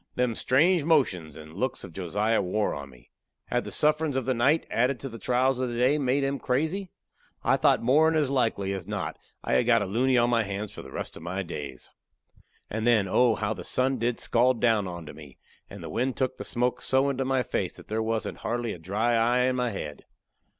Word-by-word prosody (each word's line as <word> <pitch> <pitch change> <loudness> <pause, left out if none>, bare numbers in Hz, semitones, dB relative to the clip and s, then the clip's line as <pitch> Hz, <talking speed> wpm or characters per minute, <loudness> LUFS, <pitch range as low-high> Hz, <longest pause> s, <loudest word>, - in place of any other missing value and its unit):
Them 125 -2 +1
strange 155 +9 +3
motions 95 - +1
and 80 0 -11
looks 125 +8 -3
of 95 - -10
Josiah 105 +5 0
wore 100 +3 0
on 70 -1 -7
me. 60 -2 -19 0.4
Had - - 0
the - - -6
sufferin's 150 -2 +1
of 130 - -1
the 130 - +1
night, 135 +7 +2
added 125 +2 +1
to 135 - -4
the 115 -1 -9
trials 125 +2 +1
of 130 -1 -1
the 120 - -4
day, 130 +5 +3
made 135 0 +1
him 135 0 -1
crazy? 160 +9 -1 0.5
I - - +3
thought - - +3
more'n 155 +6 +4
as 145 -4 +1
likely 110 -7 0
as 95 -2 -6
not 105 -1 -4 0.2
I - - -1
had 65 - +3
got - - +4
a - - -3
luny 125 +6 +2
on 120 0 +3
my 115 -1 +3
hands 100 0 -4
for - - -9
the - - -11
rest - - -5
of - - -10
my 90 +3 -3
days. 70 -7 -7 0.8
And 110 +2 -2
then, 110 -5 +4
oh, 120 +4 +3
how 110 0 -1
the 90 -4 -8
sun 130 +6 0
did 120 +1 -1
scald 120 +1 +2
down 110 -5 +2
onto 85 -3 -7
me, - - -13 0.3
and 100 -2 -10
the - - -6
wind 125 +9 -1
took 130 -1 -1
the - - -5
smoke 125 0 -1
so 135 +1 +2
into 135 -1 -1
my 130 -1 +1
face - - -2
that - - -13
there 110 +1 -1
wasn't 110 0 -2
hardly 120 -2 -2
a - - -10
dry 105 +8 0
eye 120 +2 +3
in 130 0 +1
my 125 -1 0
head. 85 -8 -6
120 Hz, 225 wpm, -27 LUFS, 100-130 Hz, 0.8 s, more'n